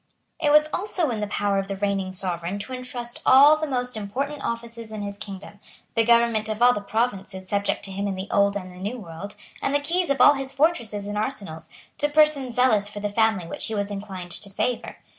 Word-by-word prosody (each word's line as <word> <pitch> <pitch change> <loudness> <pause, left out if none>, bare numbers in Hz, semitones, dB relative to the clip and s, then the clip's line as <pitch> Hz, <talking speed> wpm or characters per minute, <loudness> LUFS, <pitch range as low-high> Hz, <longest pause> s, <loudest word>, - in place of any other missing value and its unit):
It 310 -3 +2
was 300 +1 +6
also 360 -7 0
in 225 - -2
the 210 - -2
power 200 -1 0
of 195 - -3
the 195 - -3
reigning 195 -1 -1
sovereign 180 0 -3
to 230 +6 -6
entrust 250 -1 -4
all 285 +4 +8
the 310 0 -3
most 250 -3 -1
important 270 +8 -4
offices 230 -1 -5
in 215 -1 -5
his 200 0 -5
kingdom, 200 0 -8 0.3
the 230 - +3
government 235 -2 +3
of 215 0 -3
all 245 +1 +6
the 210 - -3
provinces 200 -3 -2
subject 200 +1 0
to 195 - -6
him 200 +1 -2
in 195 - -2
the 190 +1 -5
Old 200 0 +3
and 185 -2 -8
in 180 - -12
the 205 - 0
New 250 - -6
World, 195 0 -8 0.3
and 275 - 0
the - - +4
keys 340 +4 0
of 280 -2 +1
all 290 - +8
his 270 -1 -4
fortresses 260 -8 +1
and 205 0 -3
arsenals, 200 -9 -4 0.3
to 295 - +2
persons 295 -5 +3
zealous 220 -5 +3
for 205 - -7
the 205 0 -2
family 220 -3 +2
which 165 - -4
he 220 - -3
was 200 0 -2
inclined 195 -3 -6
to 200 - -4
favour. 240 +5 -2
215 Hz, 230 wpm, -24 LUFS, 200-255 Hz, 0.3 s, all